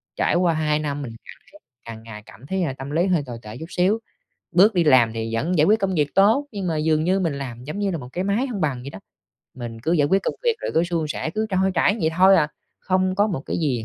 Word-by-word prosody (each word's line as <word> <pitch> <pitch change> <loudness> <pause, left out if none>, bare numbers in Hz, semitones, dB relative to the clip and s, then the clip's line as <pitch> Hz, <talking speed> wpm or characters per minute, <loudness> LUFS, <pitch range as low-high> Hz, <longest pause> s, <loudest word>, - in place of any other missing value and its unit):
trải - - +1
qua 175 -2 +3
2 155 -1 0
năm, 145 -1 -3
mình 120 -5 -6
cảm - - -13 0.3
thấy 125 - -71
càng 115 -1 -9
ngày 105 -2 -10
cảm 130 - -15
thấy, 190 +2 -1
à, 135 -6 -1
tâm 135 +1 -7
lý 170 +5 +1
hơi 175 -6 +2
tồi 120 -2 -7
tệ 105 +2 -9
chút 160 - -7
xíu. 190 +5 +2 0.5
Bước 195 +5 +5
đi 175 -2 +2
làm 125 -6 +4
thì 115 0 -3
vẫn 165 +9 0
giải 150 - +5
quyết 215 +2 +4
công 190 -2 -1
việc 145 -2 0
tốt, 220 +9 +4
nhưng 195 -4 -4
mà 160 -2 -1
dường 155 0 +1
như 190 +3 +2
mình 165 -6 0
làm 125 -3 -7
giống 155 +9 -6
như 200 -2 0
là 170 - -2
một 125 -3 -9
cái 180 - -2
máy 210 +7 0
hông 215 -6 -4
bằng 135 -5 -1
vậy 140 - -6
đó. - - -10 0.6
Mình 120 -3 -7
cứ 165 - -1
giải 145 -4 +3
quyết 195 +2 +2
công - - -2
việc 470 -2 +3
rồi - - -3
cứ 165 +2 +3
suôn 170 -3 -2
sẻ, 160 - -3
cứ 215 +4 -2
trôi 190 0 +2
chảy 205 +6 +2
vậy 160 0 +1
thôi 190 +1 +6
à, 150 -2 +2 0.3
không 185 0 0
có 205 +2 +3
một 175 -10 -3
cái - - -2
gì 130 -8 -1
160 Hz, 285 wpm, -22 LUFS, 135-190 Hz, 0.6 s, thôi